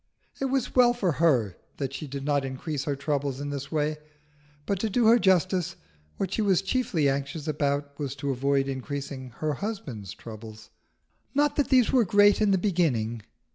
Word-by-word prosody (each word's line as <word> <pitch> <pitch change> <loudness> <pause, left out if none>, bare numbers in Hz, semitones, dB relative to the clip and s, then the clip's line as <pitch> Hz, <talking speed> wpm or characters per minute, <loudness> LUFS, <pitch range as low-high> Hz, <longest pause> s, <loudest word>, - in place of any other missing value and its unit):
It 270 - -1
was 265 -2 -1
well 245 -1 +6
for 195 -7 +1
her 130 - +2 0.2
that 135 -2 -3
she 150 - -5
did 140 0 -6
not 145 -1 +1
increase 135 +2 -4
her 145 - -1
troubles 140 -1 -2
in 145 0 -4
this 140 -1 -5
way; 155 -1 0 0.7
but 200 -2 -1
to 220 - -1
do 235 +3 +2
her 230 +2 +6
justice, 185 -3 +2 0.4
what 195 -1 -2
she - - 0
was 195 -3 +2
chiefly 195 - +1
anxious 140 +3 -2
about 145 -1 -1
was 140 -2 -3
to 140 0 -2
avoid 135 +1 +1
increasing 135 -1 -5
her 155 -1 -1
husband's 130 - -5
troubles. 110 -1 -11 0.6
Not 290 0 +2
that 290 - +1
these 255 -4 +4
were 255 -3 +5
great 205 +1 +4
in 210 - +4
the 195 - +4
beginning. 145 - 0
150 Hz, 180 wpm, -27 LUFS, 135-195 Hz, 0.7 s, well